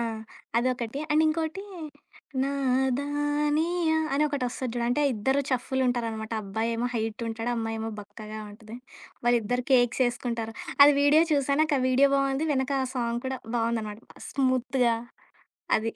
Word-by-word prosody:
ఆ! - - +1 0.5
అదొకటి. 250 +1 0
అండ్ 305 +1 +4
ఇంకోటి, 320 +4 -1 0.8
నదానియా 290 +5 +1 0.2
అని 285 - +2
ఒకటిస్తది 255 -3 -3
చూడు. 240 - -1
అంటే 245 +5 +1
ఇద్దరు 265 +6 +1
చేఫు‌లు 260 +1 0
ఉంటారనమాట. 230 -2 -2
అబ్బాయేమో 230 +4 -1
హైట్ 225 0 -2
ఉంటాడు, 225 +1 -3
అమ్మాయేమో 225 0 -3
బక్కాగా 215 +1 -9
ఉంటది. 220 +2 -11 0.5
వాళ్ళిద్దరూ 240 +1 +2
కేక్స్ 245 0 +3
జేసుకుంటారు. 235 -2 -2 0.3
అది 290 +1 +9
వీడియో 290 +3 +6
చూసా 280 -2 +1
వెనక 310 0 +2
ఆ - - 0
వీడియో 265 +2 +5
బాగుంది. 275 +2 +1
వెనక 265 0 0
ఆ 260 - -1
సాంగ్ 235 -1 -1
కూడా 260 0 -3 0.2
బావుందనమాట. 225 -2 -1 0.3
స్మూత్‌గా. 255 -2 +1 0.8
అది. 225 +1 -2
250 Hz, 130 wpm, -27 LUFS, 230-280 Hz, 0.8 s, అది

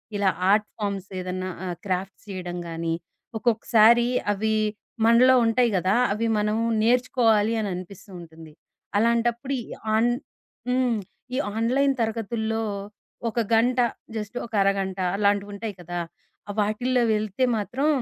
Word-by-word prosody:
ఇలా 200 -1 +2 0.2
art 210 0 +3
forms 200 -3 -3
ఏదన్నా 185 0 -4 0.2
ఆహ్, 175 -1 -3
క్రాఫ్‌ట్స్ 190 +1 -3
చేయడం 180 -2 -5
గానీ. 165 0 -2 0.4
ఒక్కొక్కసారి 235 0 +4 0.2
అవి 220 +2 0 0.5
మనలో 245 +3 +6
ఉంటాయి 235 +2 +3
గదా! 185 +2 +1 0.2
అవి 225 +2 -1
మనం 210 +1 0 0.2
నేర్చుకోవాలి 230 -2 +3
అని 210 -2 -1
అనిపిస్తుంటుంది. 175 -4 -10 0.5
అలాంటప్పుడు 235 +4 +1
ఈ - - -10 0.3
ఆన్ 230 +2 +3 0.6
హ్మ్. 250 -2 +2 0.4
ఈ - - 0 0.2
ఆన్‌లైన్ 260 +5 +2
తరగతుల్లో, 225 0 -1 0.7
ఒక 230 - -2
గంట 240 +3 +3 0.4
జస్ట్ 210 0 -5
ఒక 230 - -15
అరగంట 195 -1 0 0.2
అలాంటివుంటాయి 205 +1 0
కదా! 175 +1 -4 0.5
ఆహ్, 205 - -4
వాటిల్లో 240 +4 +1
వెళ్తే 215 +4 0
మాత్రం, 240 +8 -1
215 Hz, 120 wpm, -25 LUFS, 195-235 Hz, 0.7 s, మనలో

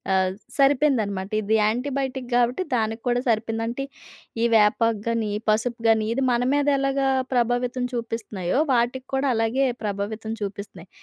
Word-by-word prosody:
ఆహ్, 185 0 +2 0.2
సరిపోయిందనమాట. 250 -9 +2
ఇది 215 +2 +1
యాంటీబయోటిక్ 260 +4 -1
కాబట్టి 245 +7 +2
దానికి 225 -1 0
కూడా 245 0 +2
సరిపోయింది. 225 0 0
అంటే, 245 +4 -3 0.6
ఈ - - +2
వేపాకు 220 +1 +3
గాని 230 -2 0
ఈ - - 0
పసుపు 230 +2 0
గాని 220 -1 +4
ఇది 270 +2 -1
మన 240 +1 +1
మీదెలాగా 275 -1 +1 0.3
ప్రభావితం 245 +1 0
చూపిస్తున్నాయో, 225 -3 -2
వాటికి 250 +2 0
కూడా 270 0 +1
అలాగే 225 +5 +1 0.2
ప్రభావితం 210 +2 -3
చూపిస్తున్నాయి. 200 -3 -7
230 Hz, 135 wpm, -24 LUFS, 215-255 Hz, 0.6 s, గాని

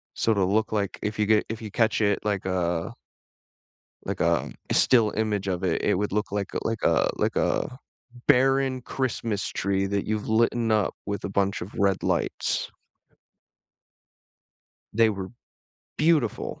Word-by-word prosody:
Sorta 105 -4 +2
look 110 +4 +1
like, 100 -3 -2
if 105 +1 -3
you 105 - +3
get 110 0 +3
if 115 0 -5
you 110 - -7
catch 110 0 +1
it, 100 -2 +2
like 100 -3 -1
a 90 +1 -1 1.1
like, - - -3
um, - - +1 0.2
still 115 -5 +4
image 105 -3 -1
of 90 -2 -2
it, - - 0
it - - +2
would 105 +2 -1
look 105 +1 -1
like 100 -1 -3
a - - -1
like 115 0 -1
a - - +3
like - - -1
a 125 - 0 0.5
barren 135 0 +3
Christmas 115 -5 -2
tree 95 0 -1
that 100 0 -1
you've 110 0 -2
litten 115 +1 +2
up 105 -1 +2
with 100 0 -4
a - - -3
bunch 100 0 0
of 95 - -7
red 100 -1 +1
lights. - - -1 2.2
They 115 0 +4
were 95 -3 -5 0.7
beautiful. 150 -8 +1
105 Hz, 155 wpm, -26 LUFS, 100-115 Hz, 2.2 s, still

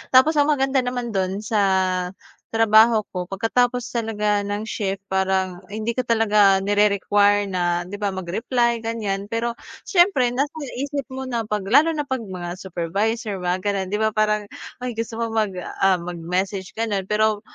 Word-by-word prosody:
Tapos 300 +4 +6
ang 290 - +4
maganda 270 -2 +2
naman 245 -1 -3
do'n 195 0 -2
sa 215 0 0 0.9
trabaho 225 0 +5 0.2
ko 180 - -1
pagkatapos 245 +5 +1 0.2
talaga 210 -3 0
ng 205 +2 -4
shift 195 -3 -2
parang 190 -1 0
hindi 220 +2 -3
ko 255 - 0
talaga 210 -4 +4
nire-require 205 0 +3
na 175 -2 -1
'di 200 - -6
ba, 205 -1 -2
mag-reply 230 +6 -1
ganiyan, 205 -3 -3
pero 235 +1 -1 0.3
siyempre 350 - +4
nasa 280 +3 0 0.2
isip 280 +1 -3
mo 265 -1 -6
na 235 -4 -3
'pag 210 -2 -2
lalo 315 +5 +5
na 295 - -1
'pag 260 -2 -2
mga 185 -4 -6
supervisor 195 +4 -2
mga 180 +1 -1
gano'n 200 -2 -1
'di 205 - -2
ba 220 - +2
parang, 210 -1 0 0.3
ay 250 - -2
gusto 230 0 -4
mo 230 0 -2
mag, 215 -4 0 0.2
ah, 195 -1 +4
mag-message 180 +2 -3
gano'n. 205 -4 -2
Pero 215 0 +2
210 Hz, 160 wpm, -22 LUFS, 195-235 Hz, 0.9 s, Tapos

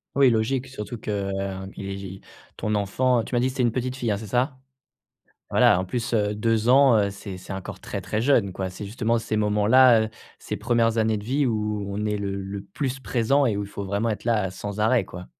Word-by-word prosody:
Oui, 140 -2 +6
logique, 120 +3 0
surtout 120 -2 -6
que, 110 - -8
heu, 95 -1 -3
i 95 -1 -6 0.4
ton 105 0 -1
enfant, 115 +4 +1
tu - - -10
m'as 120 - +3
dit 125 - +1
que - - -2
c'était 130 -1 -1
une 120 - +3
petite 125 +2 -2
fille, 120 -5 -1
hein, 100 - 0
c'est 110 - -8
ça? 130 +5 0 0.9
Voilà, 90 - +5
en 95 - -2
plus, 120 +5 -3
heu, 105 -2 +1
2 115 +1 +1
ans, 135 -1 +6
heu, 100 - +1
c'est 100 -1 -8
c'est 90 - -10
encore 95 -1 -6
très, - - -5
très 105 - -2
jeune, 115 -7 +2
quoi. 95 0 -3
C'est 90 +3 -8
justement 115 +2 0
ces 110 -1 -2
moments-là, 110 +3 +5
heu, 110 - -4 0.3
ces - - -5
1res 115 0 +1
années 110 -1 +2
de 100 - -7
vie 135 +5 +1
où 105 -2 -1
on 105 +2 -3
est 105 - 0
le 100 -1 -3
le 100 +1 -5
plus 130 +7 -4
présent 135 +3 +2
et 105 -4 0
où 100 - -2
il 100 - -7
faut 100 - -6
vraiment 100 +4 -1
être 105 - -5
là, 110 -4 +1
heu, - - -10
sans 100 +2 -6
arrêt, 110 +1 +3
quoi. 90 -1 -9
110 Hz, 240 wpm, -24 LUFS, 100-120 Hz, 0.9 s, Oui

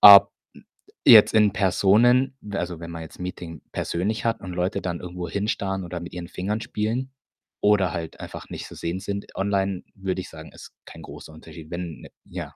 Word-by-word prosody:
ob 100 -1 +11 0.7
jetzt 110 -2 +9
in 105 -3 +5
Personen, 120 +7 +4
we 105 -1 -4
also, 85 -2 -4
wenn 85 0 -7
man 85 0 -6
jetzt 80 - -12
Meeting 90 -3 -6
persönlich 100 +7 -2
hat 115 0 0
und 95 - -6
Leute 90 +3 -1
dann 85 -2 -3
irgendwohin 90 +3 -4
starren 95 -3 -1
oder 85 0 -5
mit 85 - -8
ihren 90 -1 -6
Fingern 100 +5 -2
spielen 115 +5 -2 0.5
oder 100 -3 +3
halt 80 -1 -5
einfach - - -8
nicht - - -6
zu - - -11
sehen 85 +2 -3
sind 100 +1 -5
online, 95 -1 0
würde 95 -1 -2
ich - - -9
sagen, 80 0 -11
ist - - -13
kein - - -11
großer - - -10
Unterschied, 80 0 -12
wenn 85 -3 -5
ne, - - -11 0.2
ja. - - -7
95 Hz, 190 wpm, -25 LUFS, 85-105 Hz, 0.7 s, ob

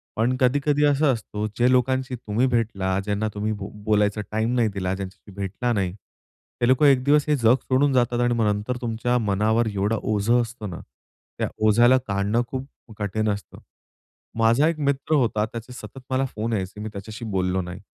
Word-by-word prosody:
पण 120 +3 +1
कधी-कधी 145 +3 +2
असं 145 -1 +3
असतं 105 -2 -4
जे 120 +1 +4
लोकांशी 130 +1 +1
तुम्ही 115 +2 0
भेटला, 100 -6 0
ज्यांना 105 +2 -1
तुम्ही 105 +1 -2
बोलायचा 105 +1 0
टाईम 110 +3 0
नाही 120 -2 +3
दिला, 95 -1 -2
ज्यांच्याशी 95 +2 -9
भेटला 100 +6 -2
नाही. 100 -4 0 0.7
हे 120 - +3
लोकं 130 +4 +4
एक 135 -3 +5
दिवस 145 +2 +4
हे 150 - +4
जग 120 -2 +4
सोडून 135 +2 +2
जातात 120 -1 +2
आणि 120 0 +2
मग 115 -2 +1
नंतर 105 +5 -3
तुमच्या 120 +1 0
मनावर 110 +4 +2
एवढं 100 +3 0
ओझं 110 +3 +2
असतं 115 -3 -6
ना. 85 - -7 0.6
त्या - - -1 0.2
ओझ्याला 120 +4 +5
काढणं 100 +3 +1
खूप 130 +2 -5 0.3
कठीण 110 +1 -1
असतं. 100 0 -5 0.9
माझा 115 +7 +4
एक 165 -1 -1
मित्र 140 +3 0
होता. 110 -6 +1
त्याचे 115 +2 -8
सतत 135 +1 -10
मला 130 +1 +1
फोन 115 +2 -2
यायचे. 95 -1 -3
मी 110 - -4
त्याच्याशी 110 +3 -7
बोललो 90 0 0
नाही. 90 +1 -7
115 Hz, 175 wpm, -24 LUFS, 105-125 Hz, 0.9 s, एक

